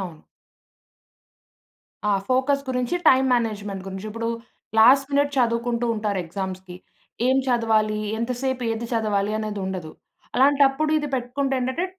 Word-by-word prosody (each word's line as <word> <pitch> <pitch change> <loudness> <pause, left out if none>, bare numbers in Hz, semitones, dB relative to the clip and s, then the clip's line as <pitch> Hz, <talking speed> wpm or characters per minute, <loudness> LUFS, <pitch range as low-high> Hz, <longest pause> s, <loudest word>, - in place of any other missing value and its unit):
అవును. 170 -5 -7 1.9
ఆ! - - +3 0.2
ఫోకస్ 265 +2 +2
గురించి, 250 +2 -1
టైమ్ 265 0 +5
మేనేజ్‌మెంట్ 210 -4 -2
గురించి. 190 +2 -6
ఇప్పుడూ 230 +1 -3 0.5
లాస్ట్ 270 +4 +6
మినట్ 285 0 +1
చదువుకుంటూ 235 0 +1
ఉంటారు 210 -2 -2
ఎగ్జామ్స్‌కి. 185 0 -6 0.5
ఏం 260 +1 +3
చదవాలి? 220 -3 +2 0.2
ఎంతసేపు 250 +2 -2
ఏది 225 +1 -4
చదవాలి? 210 -2 0
అనేదుండదు. 190 -6 -4 0.4
అలాంటప్పుడు 280 +2 +3
ఇది 295 - -3
పెట్టుకుంటే 265 +2 -1
ఏంటంటే, 260 +8 -1
235 Hz, 115 wpm, -23 LUFS, 205-260 Hz, 1.9 s, లాస్ట్